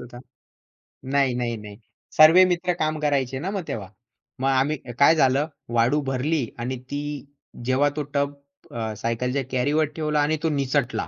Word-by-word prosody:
होता. 120 0 -11 0.9
नाही, 135 -1 +1
नाही, 120 -2 -2
नाही, 105 -1 -10 0.4
सर्व 155 +2 +8
मित्र 180 0 0
काम 155 0 0
करायचे 135 -3 0
ना, 180 +7 -3
मग 195 -3 -3
तेव्हा. 100 -4 -5 0.5
मग 135 - 0
आम्ही 135 +3 +1 0.2
काय 150 +3 +6
झालं, 135 0 +3 0.3
वाळू 120 +6 +3
भरली 140 +2 0
आणि 125 +2 -3
ती 145 0 -2 0.6
जेव्हा 130 +3 +2
तो 150 - -2
टब 140 0 0 0.4
अ, 110 -2 -3
सायकलच्या 125 +5 -1
कॅरीवर 145 +5 +2
ठेवला 150 -1 0
आणि 155 +2 +1
तो 160 - +2
निसटला. 140 -2 -1
140 Hz, 155 wpm, -24 LUFS, 125-150 Hz, 0.9 s, सर्व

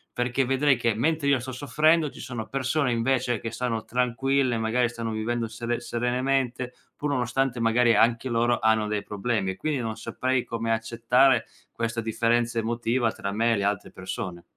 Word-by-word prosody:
perché 125 +2 0
vedrei 135 +2 +3
che 115 -2 +1
mentre 150 +6 0
io 140 -2 +4
sto 130 +2 -6
soffrendo 150 +4 +2
ci - - -13
sono 120 -4 -5
persone 135 0 0
invece 120 0 +1
che 115 - -4
stanno 115 -1 -2
tranquille, 125 +1 +1
magari 120 +2 +1
stanno 115 -1 -5
vivendo 115 +1 -2
sere 115 +2 -3
serenamente, 125 +1 -1 0.2
pur 145 - -3
nonostante 125 -1 0
magari 115 +1 +3
anche 115 +3 +3
loro 120 +1 +2
hanno 110 -1 +3
dei 105 -1 -1
problemi, 105 -1 -2
e 95 - -9
quindi 150 -4 -1
non 110 -2 -3
saprei 130 -1 -1
come 115 0 -3
accettare 115 +2 +3 0.3
questa 115 0 -3
differenza 115 +1 +1
emotiva 115 +1 0
tra 100 - -5
me 115 +3 +2
e 110 - +1
le 100 - -1
altre 100 -1 -1
persone. 90 -1 -6
120 Hz, 175 wpm, -26 LUFS, 115-130 Hz, 0.3 s, io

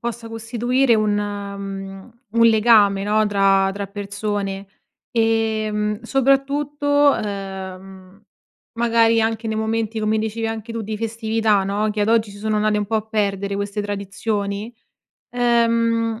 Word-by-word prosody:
possa 235 -1 -5
costituire 235 +3 +1
un 215 -1 +1
mhmm, 200 0 -5 0.2
un 230 +1 +4
legame, 215 -3 +5
no, 215 +1 +2
tra 195 -1 +3
tra 200 0 -5
persone, 200 -1 -4 0.4
ehm, 220 -2 0
soprattutto, 275 +3 0 0.2
uhm, 190 -2 -6 0.6
magari 230 -1 +3
anche 225 0 -1
nei 220 0 -2
momenti, 220 0 -1
come 215 0 +1
dicevi 220 +1 -2
anche 225 +1 -5
tu, 230 - -4
di 215 0 -4
festività, 220 -2 0
no, 205 +2 0
che 210 - -3
ad 205 - +1
oggi 225 -2 +2
si 200 - -12
sono 215 +1 -1
andate 210 0 +1
un 205 - -2
po' 225 - -3
a 215 - +1
perdere 200 -2 -1
queste 200 +1 -3
tradizioni, 205 +2 -3 0.6
uhm, 230 -1 +1
215 Hz, 135 wpm, -21 LUFS, 200-230 Hz, 0.6 s, legame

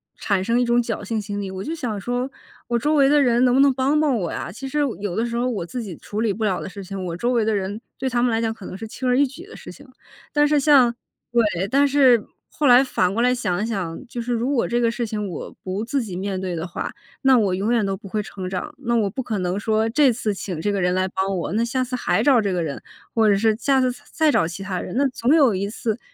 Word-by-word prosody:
产 195 -3 0
生 230 +4 +1
一 245 - +2
种 240 0 +3
侥 225 -3 -4
幸 220 +1 -2
心 205 0 -5
理， 195 -2 -4
我 190 0 -5
就 320 - -4
想 225 -10 -4
说 245 +4 -2 0.4
我 235 0 +1
周 300 +6 +1
围 275 -2 +5
的 290 +1 +4
人 245 -1 +3
能 245 - +3
不 270 - +5
能 280 -1 +6
帮 270 +4 +1
帮 285 -5 +2
我 175 -5 -2
呀， - - -5
其 255 +8 -7
实 295 +3 -2 0.2
有 200 -4 -3
的 225 - 0
时 235 0 -2
候 245 +1 +1
我 210 -8 -2
自 235 +8 -5
己 185 -6 -7
处 210 - -6
理 220 -3 +1
不 220 - -4
了 195 -4 +1
的 - - -6
事 195 +1 -8
情， 190 0 -6
我 170 -2 -4
周 240 +8 0
围 225 -3 +2
的 220 - +1
人 200 +1 -2 0.2
对 265 0 -1
他 240 0 +1
们 245 - +2
来 225 0 +1
讲 225 -1 0
可 220 -4 -10
能 - - -7
是 220 +3 -7
轻 255 +3 -5
而 250 - +3
易 285 +1 +4
举 320 +8 -11
的 440 - -13
事 - - -10
情。 - - -15 0.5
但 295 0 +4
是 295 -1 +3
像 260 -5 +5 0.4
对， 210 -6 +1
但 280 +6 +3
是 260 -5 +4 0.2
后 300 - -2
来 250 +1 +7
反 185 -8 0
过 230 - 0
来 250 +1 +3
想 185 -6 -1
一 - - 0
想， 195 -1 -4
就 240 - -7
是 240 +1 -2
如 235 +4 0
果 265 -5 +1
这 240 - 0
个 230 - +3
事 235 +1 -2
情 210 -2 -3
我 180 - -7
不 190 +3 -3
自 270 +3 -1
己 205 -6 -6
面 190 +1 -3
对 185 -2 -3
的 165 0 -3
话， 180 - -5 0.3
那 265 -2 +5
我 200 -5 +2
永 200 +5 0
远 225 -4 +2
都 195 0 -1
不 195 - -11
会 210 +2 -2
成 185 -2 -6
长。 245 +11 -4
那 235 -3 -1
我 215 -3 +2
不 260 - -4
可 225 -4 -3
能 180 +2 -1
说 220 +1 +1
这 270 +2 +4
次 220 -2 -2
请 185 -4 -5
这 205 - 0
个 200 - -1
人 180 +1 +1
来 185 0 +1
帮 190 0 -1
我， 170 - -3
那 225 +2 +1
下 255 +2 0
次 255 0 -4
还 215 -3 +1
找 260 -4 +5
这 200 -2 -1
个 175 -2 0
人， 145 -4 -5 0.3
或 220 -2 +4
者 200 - +4
是 220 +1 +2
下 270 0 +2
次 255 -1 +2
再 245 - -12
再 315 -2 +3
找 165 - +2
其 175 +3 -7
他 190 -2 -3
人， 180 - -6
那 280 - +3
总 255 +4 +2
有 275 -8 +5
一 195 +1 -2
次 220 +1 -3
225 Hz, 315 characters per minute, -22 LUFS, 195-255 Hz, 0.5 s, 来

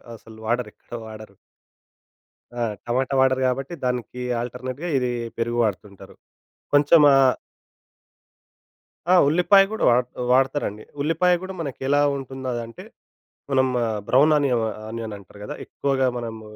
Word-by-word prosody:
అసలు 110 0 -15
వాడరు. 120 0 -1
ఎక్కడ 120 - -9
వాడరు. 110 -2 -11 1.2
ఆ! 120 - -4 0.3
టమాటా 130 +3 0
వాడరు 130 0 +3
గాబట్టి, 135 +5 -3
దానికి, 125 0 -3 0.2
ఆల్‌టర్‌నేట్‌గా 130 +6 -5
ఇది 125 -1 0 0.3
పెరుగు 120 +1 -1
వాడుతుంటారు. 100 -2 -5 0.6
కొంచెం 145 +3 +6
ఆహ్ 135 -2 +5 1.8
ఆ! - - +7
ఉల్లిపాయ 180 +6 +5
గూడా 220 - -3
వాడ 125 +1 +4 0.3
వాడతరండి. 130 -5 +1 0.2
ఉల్లిపాయ 165 +4 +2
గూడా 190 0 -6
మనకి 140 -5 -6
ఎలా 145 +1 +3 0.2
ఉంటుందో 130 0 -7
అదంటే, 115 -1 -7 0.7
మనం 130 -1 +3 0.4
బ్రౌన్ 145 +5 +5
ఆనియం 130 -5 +1 0.3
ఆనియన్ 110 -1 -5
అంటారు 100 +1 -16
గదా! - - -6
ఎక్కువగా 135 -2 0
మనము 110 -2 -6
125 Hz, 125 wpm, -23 LUFS, 115-140 Hz, 1.8 s, ఆ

